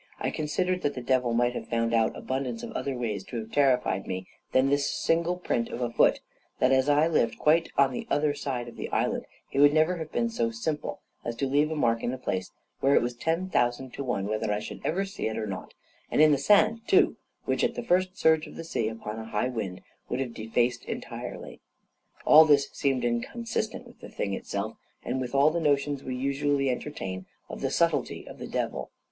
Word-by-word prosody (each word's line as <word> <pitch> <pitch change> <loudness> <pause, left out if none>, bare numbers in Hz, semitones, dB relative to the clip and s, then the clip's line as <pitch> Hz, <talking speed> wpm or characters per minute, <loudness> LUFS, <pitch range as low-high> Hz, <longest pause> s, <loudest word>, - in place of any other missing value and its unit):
I - - -1
considered 180 +4 -1
that 145 - -1
the 125 - -5
devil 125 -1 +2
might 120 +1 +2
have - - -5
found 115 0 0
out 115 -1 +2
abundance 130 -3 -3
of - - -6
other 135 -2 -3
ways 110 -5 -2
to 120 - -6
have 110 0 -6
terrified 125 -9 +2
me 95 0 -4 0.3
than 130 +1 +4
this 140 +1 +2
of - - 0
the - - -2 0.2
single 170 +2 0
print 120 -9 -1
of - - -5
a 120 -1 -1
foot; - - +3 0.4
that 130 - +3
as 130 +1 +3
I 145 +2 +5
lived 150 -8 +1
quite 165 +2 +3
on 140 -1 +5
the - - -5
other 145 0 +2
side 135 -4 -3
of 120 - -11
the - - -4
island, - - -1 0.2
he 135 - -2
would 145 +1 +6
never 160 +3 +3
have 160 -2 -6
been 235 -1 0
so 115 - 0
simple 130 +7 -3 0.2
as 120 - -3
to 135 - -1
leave 145 +3 +2
a 160 - -2
mark 115 -6 +1
in 120 - -1
a - - -4
place 95 -7 -3 0.3
where 140 +1 +4
it - - +4
was 120 +1 -2
ten 165 +9 -1
thousand 120 -5 0
to 140 - -4
one 120 -7 -1
whether 110 +1 -1
I 105 - +1
should 105 - -7
ever 195 +5 0
see 195 - -4
it 110 0 -3
or 110 - -2
not, 95 -3 -6 0.3
and - - 0
in 155 0 +7
the 140 - +3
sand, 215 +8 +4
too, 390 +1 +4 0.3
which - - 0
the - - 0
first 185 -2 +1
surge 160 -1 +3
of - - -12
the - - -6
sea, 120 -9 -1
upon 110 0 -5
a 110 - -6
high 110 +2 -1
wind, 105 -7 -4 0.3
would 125 - -1
have 125 -3 -3
defaced 120 +2 0
entirely. - - -6 0.7
All 155 +1 +9
this 145 -3 +3
seemed 135 -3 0
inconsistent 220 - -2
with 240 - -16
the - - -10
thing 100 - -3
itself, 100 +2 -4 0.3
and 130 +2 -1
with 125 +1 -4
all 140 +3 +5
the 170 - -1
notions 145 -2 +1
we 130 - -4
usually 140 +1 +1
entertain 95 -9 -5 0.2
of - - -7
the - - 0
subtlety - - 0
of - - -10
the - - -6
devil. - - -3
130 Hz, 225 wpm, -28 LUFS, 115-155 Hz, 0.7 s, All